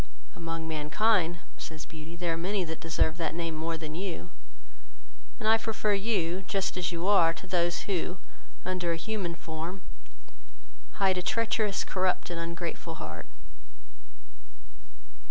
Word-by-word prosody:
"Among 165 -1 -3
mankind, 170 +3 +3 0.2
(says 160 -1 -6
Beauty,) 160 +1 -8
there 170 -1 0
are - - 0
many 185 +4 +1
that 160 -1 -4
deserve 160 0 +2
that 165 -2 -1
name 165 -1 -1
more 165 +1 -1
than 155 -1 -5
you, 175 0 -3 1.1
and 215 - -1
I 225 +1 +7
prefer 220 -2 +1
you, 195 -4 +1
just 195 -1 +1
as 180 -1 0
your 170 +2 -1
are, 165 -5 +7
to - - -9
those, 175 -2 +2
who, 185 -1 -1 0.5
under 180 -2 +1
a - - -1
human 180 -1 -2
form, 165 +3 -5 1.1
hide 190 -2 +3
a - - 0
treacherous, 215 0 +2
corrupt, 185 -1 +1
and 170 - -2
ungrateful 170 0 -3
heart." - - -6
175 Hz, 140 wpm, -30 LUFS, 165-195 Hz, 1.1 s, I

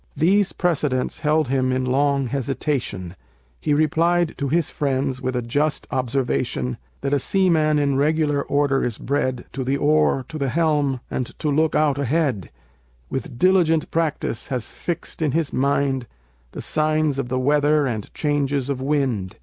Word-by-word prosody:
These 190 +6 +3
precedents 150 -7 0
held 155 -2 +1
him 130 -1 +1
in 130 0 0
long 140 +1 +2
hesitation; 130 - -3 0.4
He 150 - +1
replied 165 +3 +2
to 140 - -1
his 165 +2 0
friends, 135 -2 -1
with 130 -1 -2
a 125 - -1
just 145 +6 0
observation, 120 - -1 0.2
"That 140 +1 -1
a 145 - +3
seaman 160 -3 +2
in 140 -2 +1
regular 150 0 +2
order 140 -1 +1
is 120 -3 -2
bred 130 -3 -1
To 135 - -3
the 135 +2 0
oar, 150 -3 +2
to 155 - -6
the 140 -1 0
helm, 145 -4 +1
and 125 - -2
to 150 - -1
look 155 +2 +2
out 145 -2 +2
ahead; 140 - 0 0.6
With - - -4
diligent 170 -1 +3
practice 160 -7 -1
has 125 -4 -3
fixed 175 -1 -5
in 150 -4 +1
his 160 -3 0
mind 135 -2 +1 0.5
The - - -6
signs 155 -2 +1
of 130 -3 -3
the 130 - -1
weather, 145 +2 +3
and 110 -5 -4
changes 145 -2 0
of 130 -2 -3
wind. 130 -10 -1
140 Hz, 160 wpm, -22 LUFS, 130-155 Hz, 0.6 s, These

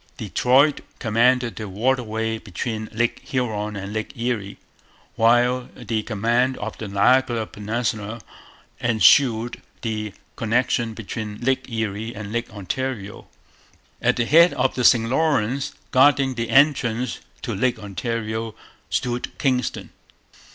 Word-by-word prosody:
Detroit 140 +4 +3 0.2
commanded 120 +1 +2
the 110 -2 -5
waterway 110 0 -1
between 110 +2 -5
Lake 120 +2 0
Huron 110 -7 -2
and 100 +1 -6
Lake 110 +2 -4
Erie; 115 -4 -2 0.6
while 120 +2 +3
the 110 -2 -2
command 120 +4 0
of 110 +1 -5
the 110 - -5
Niagara 115 +3 +3
peninsula 110 +1 -3 0.6
ensured 115 - +4 0.2
the 110 -2 -3 0.2
connection 115 0 0
between 105 -1 -6
Lake 130 +2 0
Erie 110 0 -3
and 105 -1 -7
Lake 120 0 -2
Ontario. 105 +1 -5 0.7
At - - +3
the 120 - 0
head 170 +7 +6
of 130 +1 +1
the 125 - -2
St 115 -2 +5
Lawrence, 135 -2 0 0.2
guarding 135 0 +4
the 115 -1 -3
entrance 130 -4 +2 0.2
to 115 - -3
Lake 120 +5 +1
Ontario, 110 +1 -4 0.3
stood 125 0 -2
Kingston. 125 -3 -1
115 Hz, 120 wpm, -23 LUFS, 110-125 Hz, 0.7 s, head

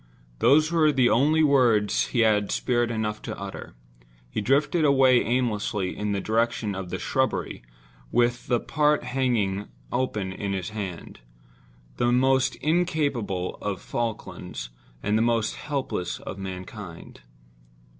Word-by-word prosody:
Those 155 +6 +4
were 160 -3 +4
the 130 -4 +3
only 150 +7 +4
words 120 -8 +3
he 120 - +1
had 105 -2 +3
spirit 120 -2 +1
enough 110 -2 -2
to - - -6
utter. 100 -9 -8 0.6
He - - -2
drifted 145 - +2
away 130 -3 +5
aimlessly 105 -5 -1
in 105 0 -2
the 100 - 0
direction 115 0 0
of 95 -1 -5
the - - -3
shrubbery, - - -1 0.5
with 120 0 +1
the 120 -2 +2
part 150 +3 +1
hanging 110 -7 0 0.2
open 105 -7 -1
in 100 +1 -3
his 95 -2 -3
hand—the - - -6
most 130 +1 +3
incapable 145 - -1
of 100 -1 -3
Falklands, 110 - -5 0.3
and 105 +2 +2
the - - +2
most 115 -1 +1
helpless 135 - -3
of 95 - -7
mankind. 95 - -8
115 Hz, 130 wpm, -25 LUFS, 100-130 Hz, 0.6 s, away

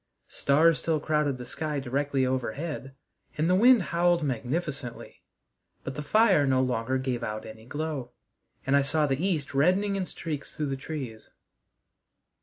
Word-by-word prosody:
Stars 155 +3 +3
still 160 -2 0
crowded 150 -3 0
the 125 - -7
sky 150 +3 -3
directly 135 +1 0
overhead, 130 +2 -3 0.4
and 155 +2 +1
the 180 - +3
wind 235 +2 +6
howled 175 -1 +3
magnificently, 135 0 -4 0.6
but 135 - -4
the 150 - -5
fire 190 -1 +4
no 130 -1 +3
longer 130 0 0
gave 130 -2 -2
out 110 0 -4
any 110 0 -11
glow, 145 -3 -4 0.6
and 135 - +3
I 140 - +5
saw 150 +2 +1
the 140 +3 -1
east 160 -8 -1
reddening 185 +8 +2
in 190 -2 -2
streaks 150 -4 -6
through 150 -2 -2
the 135 - -1
trees. 130 -5 -7
145 Hz, 155 wpm, -27 LUFS, 130-160 Hz, 0.6 s, wind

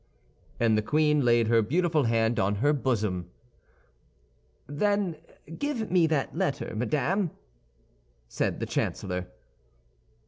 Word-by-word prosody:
And 115 -2 +3
the 110 - +2
queen 150 +4 +2
laid 120 -2 +3
her 115 0 +4
beautiful 155 - +1
hand 115 0 +1
on 100 +1 +1
her 145 +8 +2
bosom. 105 - -1 1.4
"Then 190 +3 0 0.4
give 275 -9 -2
me 175 -3 +4
that 150 -3 -1
letter, 180 -5 -2
madame," 155 - 0 1.0
said - - -2
the - - -2
chancellor. 90 -1 -3
140 Hz, 110 wpm, -27 LUFS, 110-165 Hz, 1.4 s, her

